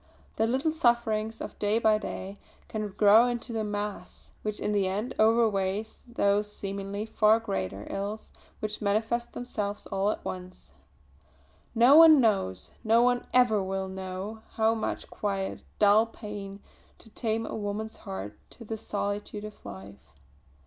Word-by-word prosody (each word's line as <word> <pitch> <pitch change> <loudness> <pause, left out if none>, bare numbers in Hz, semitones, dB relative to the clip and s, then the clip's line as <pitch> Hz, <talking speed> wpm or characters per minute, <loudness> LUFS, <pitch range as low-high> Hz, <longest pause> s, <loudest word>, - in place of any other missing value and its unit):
The 225 - +2
little 265 +6 +1
sufferings 225 -6 +1
of - - -7
day 210 +1 +2
by 220 -2 +3
day 195 -1 -6 0.3
can 215 -1 -3
grow 210 +4 +6
into 240 -1 -3
a - - 0
mass 205 0 -5
which 215 -1 -3
in - - -1
the 200 -2 +2
end 210 +7 -2
outweighs 215 -2 +2
those 210 -3 +1
seemingly 200 +1 -4
far 220 0 +4
greater 100 - -4
ills 205 +2 -5 0.3
which 215 0 -3
manifest 225 +4 0
themselves 210 -4 -4
all 195 +1 +1
at - - -3
once. 180 - -8 1.0
No 240 +5 +7
one 320 -2 +9
knows, 195 - +1
no 230 +1 +4
one 245 0 +1
ever 245 -5 +4
will 190 0 -2
know, 190 +3 -6
how 220 0 +3
much 225 - -3
quiet, 195 -2 -3 0.2
dull 210 +2 +5
pain 210 -3 -7
goes 200 - -13 0.4
to 225 - -16
tame 225 -1 -1
a - - -6
woman's 215 +1 -4
heart 95 +2 -7
to 230 - -13
the 220 +1 -4
solitude 205 0 -4
of 215 0 -10
life. 100 +1 -11
210 Hz, 150 wpm, -28 LUFS, 200-225 Hz, 1.0 s, one